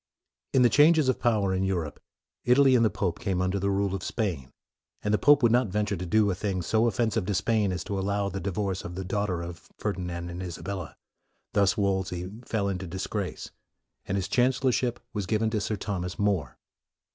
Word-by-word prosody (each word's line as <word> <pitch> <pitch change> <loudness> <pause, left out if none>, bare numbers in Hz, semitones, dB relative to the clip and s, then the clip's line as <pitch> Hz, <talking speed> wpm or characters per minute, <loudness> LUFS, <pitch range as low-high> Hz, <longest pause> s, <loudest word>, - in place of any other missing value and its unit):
In 130 -2 +4
the 120 - +6
changes 150 +2 +5
of 130 - +1
power 105 -5 +2
in 95 0 0
Europe, 90 -6 -2 0.4
Italy 130 +2 +5
and 120 - +4
the 110 - +4
pope 90 -5 -2
came 95 -3 -1
under 95 +2 0
the 100 +1 0
rule 100 -1 0
of 95 - -3
Spain, 95 - -3 0.5
and 105 - 0
the 105 - +3
pope 145 -2 +5
would 115 - +5
not 125 0 +3
venture 105 +1 -1
to 90 0 -5
do 105 +2 +3
a - - 0
thing 95 -1 -2
so 110 +6 +2
offensive 115 -4 0
to 105 - 0
Spain 105 0 +1
as 90 -1 -3
to 100 -1 -3
allow 100 +1 0
the 100 0 -4
divorce 95 0 -2
of 85 - -7
the 95 +1 -4
daughter 95 -3 -1
of 85 0 -9
Ferdinand 90 -4 -3
and 90 +1 -6
Isabella. 90 -1 -5 0.6
Thus 100 -1 +3
Wolsey 95 -2 -1
fell 110 -4 -1
into 95 -1 -3
dis 95 +3 -4
grace, 100 -4 -4 0.6
and 95 - -1
his 95 -1 -1
chancellorship 125 +1 +1
was 100 -4 -3
given 110 +2 +1
to 110 -2 0
Sir 105 - -1
Thomas 90 -3 -4
More. 100 -6 0
100 Hz, 205 wpm, -27 LUFS, 95-110 Hz, 0.6 s, the